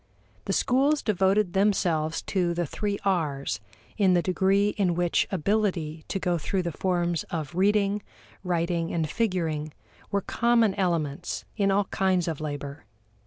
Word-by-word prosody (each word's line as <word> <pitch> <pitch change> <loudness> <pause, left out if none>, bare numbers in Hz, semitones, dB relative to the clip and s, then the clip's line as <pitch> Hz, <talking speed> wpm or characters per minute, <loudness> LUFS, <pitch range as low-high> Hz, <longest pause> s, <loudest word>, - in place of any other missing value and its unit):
The - - -1
schools 275 +4 +2
devoted 195 -1 +2
themselves 175 -6 +1
to 175 -3 0
the 175 0 0
three 205 +6 -2
R's 145 - 0 0.4
in 190 -4 +4
the 175 - +2
degree 195 +2 +2
in 190 -5 0
which 175 0 +1
ability 180 -4 -1
to - - -2
go 175 -2 0
through 185 +4 -1
the 170 - -2
forms 175 0 0
of 160 -1 -5
reading, 200 +2 +2 0.4
writing, 170 -1 -1
and 165 -2 0
figuring 160 -7 -1 0.4
were 200 -1 0
common 230 -1 +2
elements 170 -3 -2
in 200 -2 +2
all 200 +1 +2
kinds 185 -2 +1
of 160 -3 -3
labor. 145 -1 -5
180 Hz, 145 wpm, -26 LUFS, 165-200 Hz, 0.4 s, in